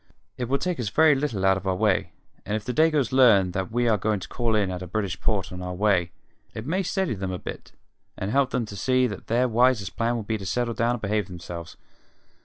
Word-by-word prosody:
It 125 -1 -4
will 140 - +2
take 175 +3 -2
us 115 -4 -1
very 155 +7 +5
little 135 -9 -1
out 95 0 +4
of 95 0 -6
our 95 - +1
way, 105 0 +1 0.3
and 105 - -2
if 110 - -4
the 125 - -2
Dagoes 155 -4 +2
learn 110 -8 +5
that 95 0 -3
we 120 +1 +1
are 110 -3 +3
going 105 +1 0
to - - -7
call 115 -2 0
in 100 -3 +1
at 90 0 -5
a 90 - -6
British 95 -1 -3
port 100 -6 -1
on 90 0 -7
our 90 0 -4
way, 90 -3 +2 0.4
it 110 - -6
may 180 +7 0
steady 190 - -1
them 95 -2 -4
a 90 - -3
bit - - -8 0.4
and 95 - -3
help 135 +1 +3
them 125 -2 -1
to 105 - -9
see 130 +5 +2
that 100 -6 -5
their 120 +3 +2
wisest 120 -4 +2
plan 115 +1 0
will 115 - -3
be 110 +1 -2
to 100 - -7
settle 120 +3 -1
down 115 +2 +1
and 120 - -5
behave 105 -1 0
themselves. 85 -2 -8
110 Hz, 250 wpm, -25 LUFS, 95-125 Hz, 0.4 s, very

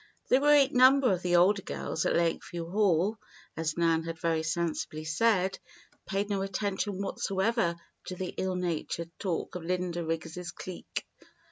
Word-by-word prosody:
The 255 - +5
great 290 -1 +5
number 255 0 +6
of 180 - -2
the 175 -1 +1
older 195 +4 +5
girls 160 - -3
at - - +1
Lakeview 170 0 -1
Hall, 200 0 +2 0.4
as 160 0 -2
Nan 165 -1 +3
had 165 0 -5
very 165 0 0
sensibly 155 -1 -2
said, 190 +3 +2 0.5
paid 200 +1 -1
no 200 -2 -1
attention 195 0 -2
whatsoever 195 -1 0 0.3
to 185 - -5
the 185 0 -4
ill 190 -1 -1
natured 170 -1 -3
talk 180 -5 -2
of 180 - -5
Linda 175 0 -2
Riggs' 165 +2 -4
clique. 185 0 -6
180 Hz, 150 wpm, -29 LUFS, 165-200 Hz, 0.5 s, number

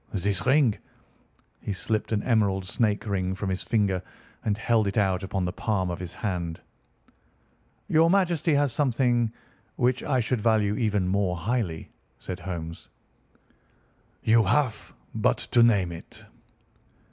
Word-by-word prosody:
This 100 +2 -1
ring—" 130 -5 +4 0.8
He 105 - -3
slipped 105 +6 -2
an 105 -2 0
emerald 100 -5 +1
snake 105 +2 0
ring 95 -2 -1
from 95 0 -3
his 95 - -2
finger 100 -5 +1 0.4
and 105 -1 0
held 110 -1 +2
it 100 - -2
out 95 -3 +2
upon 95 -1 -2
the 90 - -3
palm 95 -4 -1
of 85 - -5
his 90 -2 -6
hand. 85 -6 -3 1.3
"Your 160 +1 +4
Majesty 170 -5 +2
has 140 -3 +2
something 120 -4 +1 0.4
which 125 0 +1
I 130 -3 0
should 120 0 0
value 110 -2 +2
even 105 -5 0
more 95 -2 0
highly," 100 -4 -2 0.3
said 95 - -6
Holmes. 85 -2 -6 1.3
"You 115 +1 +5
have 115 +1 0 0.2
but - - +2 0.2
to 120 - +6
name 100 -7 +4
it." 85 - -11
105 Hz, 140 wpm, -26 LUFS, 95-120 Hz, 1.3 s, to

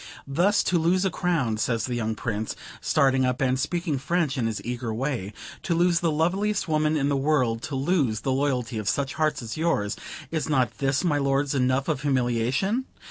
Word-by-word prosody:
"Thus 175 +9 +2
to 175 - +2
lose 180 +4 +2
a 190 - +1
crown," 155 -13 0
says 115 0 0
the 125 - -3
young 110 -2 -1
Prince, 110 -1 -3 0.3
starting 135 -1 +3
up, 125 0 0
and 130 -1 +1
speaking 170 -2 -1
French 155 0 0
in 120 -3 0
his 110 -2 -3
eager 120 -1 -3
way; 115 -4 -2 0.3
"to 170 - -1
lose 175 0 +3
the 170 - +1
loveliest 190 +7 0
woman 155 0 +2
in 140 -1 +1
the 145 - +1
world; 135 -5 +1
to 140 - -4
lose 135 - +1
the 135 - -1
loyalty 130 -4 0
of 100 -2 -1
such 140 -1 -1
hearts 155 -4 0
as 115 +3 -6
yours, 155 -11 0 0.4
is 160 -2 -2
not 125 -6 +1
this, 135 +2 +1
my 150 -5 +2
lords, 140 0 +1
enough 130 0 +1
of 130 - -1
humiliation? 135 - 0
135 Hz, 195 wpm, -25 LUFS, 125-160 Hz, 0.4 s, starting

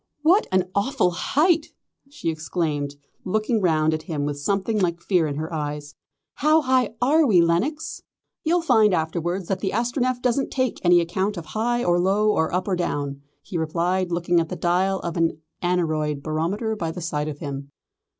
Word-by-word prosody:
"What 360 +7 +4
an 185 -1 +2
awful 200 -3 +1
height!" 310 - +2 0.4
she 285 - -4
exclaimed, 155 -3 -2 0.3
looking 215 +3 0
round 160 -3 +2
at 155 - -2
him 155 -4 -3
with 145 -1 -3
something 200 +7 0
like 170 -3 0
fear 175 -3 +1
in 145 - -3
her 160 +3 -4
eyes. 150 -1 -4 0.4
"How 310 +3 +4
high 255 -5 +1
are 305 +5 +4
we, 195 -7 +5
Lenox?" 180 - 0 0.4
"You'll 340 +2 +2
find 215 - +4
afterwards 170 +3 -2
that 195 - -1
the 195 - -1
Astronef 245 +2 0
doesn't 250 +2 0
take 255 -3 -2
any 175 -1 +6
account 190 +4 -1
of 170 - -6
high 235 +9 -1
or 175 0 +2
low 200 +4 +3
or 160 -5 +1
up 185 +2 -1
or 190 - +1
down," 145 -5 -3 0.2
he 175 -2 -4
replied, 175 +3 0
looking 175 0 +2
at 165 -1 -1
the - - -4
dial 185 +2 +1
of 170 -1 -4
an 165 -2 +1 0.2
aneroid 155 -5 0
barometer 180 +9 -1
by 170 -6 -3
the 165 - -6
side 150 -3 -2
of 150 -2 -5
him. 140 -2 -6
175 Hz, 180 wpm, -23 LUFS, 160-215 Hz, 0.4 s, any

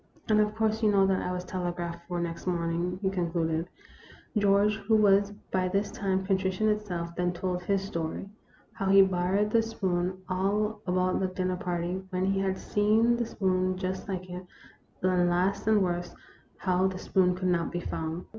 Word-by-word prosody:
" - - -24
And, 215 -1 +4
of 210 0 +1
course, 220 0 0
you 215 - +4
know 195 -1 +4
that 190 -1 +1
I 180 - -2
was 180 0 -3
telegraphed 175 -2 -4
for 175 -1 -2
next 170 +1 -4
morning," 170 0 -1
he 190 - +1
concluded. 165 -2 -1 0.7
George, 205 0 +3
who 220 +1 +1
was 200 -1 +4 0.2
by 185 -1 +1
this 200 +3 -1
time 190 -1 -1
contrition 190 +1 +1
itself, 180 -5 -2
then 180 0 0
told 180 0 -2
his 195 +2 0
story. 170 -1 -4 0.5
How 195 - -3
he 195 0 +8
borrowed 190 +3 +1
the 230 - +4
spoon; 185 -5 -1
all 200 +4 0
about 185 0 +1
the 190 - +1
dinner 185 0 -2
party; 180 +1 -2
when 185 0 -1
he 195 0 +1
had 190 -1 0
seen 220 +3 +2
the 235 -1 -2
spoons 185 -3 0
just 185 +1 -4
like 185 -1 -4
it; 180 +1 -7 0.6
and 180 -1 +3
last 185 +4 0
and 215 -2 +4
worst, 175 -1 -2 0.4
how 185 0 +2
the 190 -1 -4
spoon 180 -1 +2
could 185 0 -1
not 170 -2 0
be 175 - -2
found. 160 +1 -4
185 Hz, 185 wpm, -28 LUFS, 180-200 Hz, 0.7 s, he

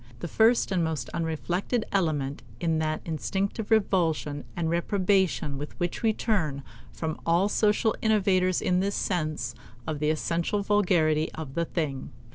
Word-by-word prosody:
The 170 - -5
first 225 +5 +3
and 180 -3 +2
most 155 -7 -2
unreflected 175 +7 -1
element 150 -8 0 0.2
in 165 -2 +1
that 155 0 -1
instinctive 195 +6 -2
revulsion 170 -9 +1
and 170 -2 -1
reprobation 180 -4 +1
with 150 - -7
which 175 0 -2
we 225 -1 +3
turn 165 - -1 0.3
from 160 -1 -4
all 170 +4 +3
social 210 +1 +2
innovators 190 -4 +2
is 180 0 +2
this 200 +1 0
sense 155 -8 -1 0.3
of 155 -2 -3
the 150 0 +1
essential 170 +5 0
vulgarity 170 -7 +2
of 155 -4 -7
the 170 +2 0
thing. 150 -6 -3
170 Hz, 145 wpm, -27 LUFS, 155-200 Hz, 0.3 s, first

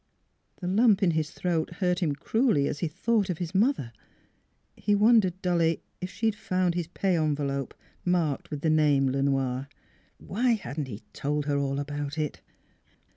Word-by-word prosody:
The 180 - -3
lump 210 +1 +4
in 175 - +4
his 155 -1 -1
throat 170 -2 -2
hurt 180 -1 +1
him 155 -6 0
cruelly 220 - +2
as 145 - -3
he 170 - 0
thought 210 +5 0
of 180 - -1
his 170 -1 -4
mother. 200 - +1 0.8
He 205 - +1
wondered 205 -4 +4
dully 170 -2 +1 0.2
if 180 - -3
she 225 +4 -4
had 220 - +3
found 185 -4 0
his 170 -2 -2
pay 185 +1 0
envelope, 145 -4 -1 0.3
marked 170 -6 0
with 150 -2 -5
the 160 - +2
name 145 -3 +4
Le 135 +1 0
Noir. 135 -1 0 0.5
Why 240 +5 0
hadn't 150 - -4
he 110 -2 -8
told 150 +1 -2
her 145 -1 +1
all 140 -1 -1
about 145 +1 -4
it? 150 -2 -3
165 Hz, 175 wpm, -27 LUFS, 145-190 Hz, 0.8 s, lump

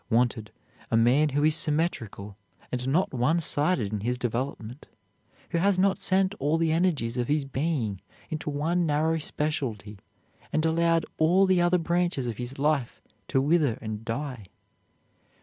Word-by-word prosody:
Wanted, 115 -2 +1 0.4
a 115 - +2
man 130 +7 +4
who 145 +1 0
is 155 0 +4
symmetrical, 145 - -2 0.4
and 125 0 -3
not 160 +6 +1
one 135 +7 +2
sided 145 - +1
in 105 - -1
his 120 +4 -2
development, 125 +1 -4 0.6
who 170 - +1
has 195 +1 +2
not 195 +1 +2
sent 190 +1 +3
all 150 +3 +1
the 165 -1 +1
energies 160 -9 0
of 120 -1 -1
his 145 -1 0
being 135 - -2 0.3
into 155 -1 -3
one 165 +4 0
narrow 160 +2 +1
specialty 120 -10 -4 0.5
and 155 +1 0
allowed 165 0 +2
all 175 +5 +4
the 185 -2 +3
other 175 +1 +3
branches 170 -5 0
of 115 -3 -4
his 125 +2 -6
life 140 -3 0 0.3
to 135 - +1
wither 145 -4 +2
and 110 -1 -6
die. 120 -2 -5
145 Hz, 155 wpm, -27 LUFS, 120-165 Hz, 0.6 s, man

